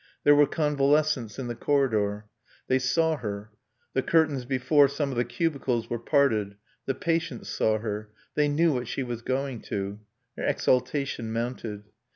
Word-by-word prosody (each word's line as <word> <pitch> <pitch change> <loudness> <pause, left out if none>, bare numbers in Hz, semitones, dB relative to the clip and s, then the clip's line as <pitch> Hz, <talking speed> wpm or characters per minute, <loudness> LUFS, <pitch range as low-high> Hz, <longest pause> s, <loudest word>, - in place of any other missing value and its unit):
There 145 - +7
were 145 0 +6
convalescents 150 -5 +1
in 135 - -4
the 120 - -3
corridor. 110 -6 +1 0.4
They 130 - +3
saw 160 +5 +2
her. 105 -3 -5 0.4
The 130 - +2
curtains 150 -4 +2
before 135 +3 +4
some 140 0 -2
of - - -4
the 120 - +2
cubicles 125 -2 -1
were 120 - -1
parted; 115 -7 +2 0.3
the 135 - 0
patients 165 -6 -2
saw 110 0 +1
her; 105 -1 -4 0.2
they 150 0 +2
knew 155 +2 +3
what 125 -2 -2
she 135 - -2
was 120 -2 -5
going 130 -1 -2
to. 100 +1 -3 0.4
Her - - -4
exaltation 125 -2 0
mounted. 115 -3 -4
130 Hz, 160 wpm, -27 LUFS, 115-145 Hz, 0.4 s, There